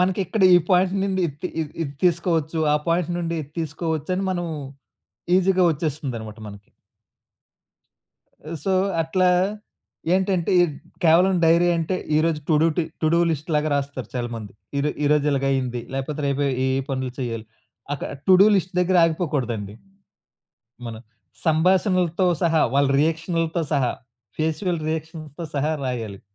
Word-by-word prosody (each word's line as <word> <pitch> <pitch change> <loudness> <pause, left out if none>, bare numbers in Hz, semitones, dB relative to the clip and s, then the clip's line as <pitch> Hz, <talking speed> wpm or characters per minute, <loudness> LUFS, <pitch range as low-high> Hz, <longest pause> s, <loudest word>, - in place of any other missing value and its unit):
మనకిక్కడ 190 +2 0
ఈ - - +8
పాయింట్ 185 +1 +3
నుండి, 190 -1 -1
ఇద్‌తి 150 +5 -6
ఇద్ 150 - -8
ఇది 140 -3 -4
తీసుకోవచ్చు. 165 -2 +1 0.2
ఆ - - +4
పాయింట్ 170 0 +1
నుండి 170 -1 -2
ఇది 140 - -13
తీసుకోవచ్చు 160 0 -3
అని 195 - -1
మనం, 175 -1 -3 0.9
ఈజీ‌గా 190 -1 +3
వచ్చేస్తుందన్నమాట 130 -8 -4
మనకి. 100 -1 -13 1.9
సో, 195 - +1 0.3
అట్లా 180 +3 +2 0.9
ఏంటంటే, 185 -3 +1
ఎడ్ 155 -5 -1 0.3
కేవలం 175 +4 +5
డైరీ 170 +2 +4
అంటే, 165 +3 -1 0.2
ఈరోజు 155 0 +1
to 160 - +4
do - - +5
T 170 - +2 0.2
to - - +3
do 170 - +4
లిస్ట్‌లాగా 155 0 -1
రాస్తారు 140 -4 -3
చాలామంది. 120 -4 -4 0.3
ఈ - - +1
రొ 150 - +1
ఈ - - +3
రోజు 150 -1 +2
ఇలాగయ్యింది. 135 -3 0
లేకపోతే, 135 +3 -3
రేపు 140 +1 0
ఏ, 130 0 0
ఏ - - +1 0.2
పనులు 130 -2 -3
చేయాలి. 115 -4 -4 0.5
అక్కడ 140 - -6 0.2
టు 190 - +8
డు - - +7
లిస్ట్ 185 -1 -2
దగ్గర 180 +1 +2
ఆగిపోకూడదండి. 135 - -2 1.1
మనం 115 -1 -7 0.5
సంభాషణలతో 180 +2 +2 0.2
సహా, 165 -2 +3
వాళ్ళ 140 0 +4
రియాక్షన్లుతో 165 +1 0
సహా, 135 -4 +2 0.5
ఫేసియల్ 160 +2 -1
రియాక్షన్‌తో 160 0 -5
సహా 145 +2 0
రాయాలి. 115 -6 -4
160 Hz, 140 wpm, -23 LUFS, 135-175 Hz, 1.9 s, ఈ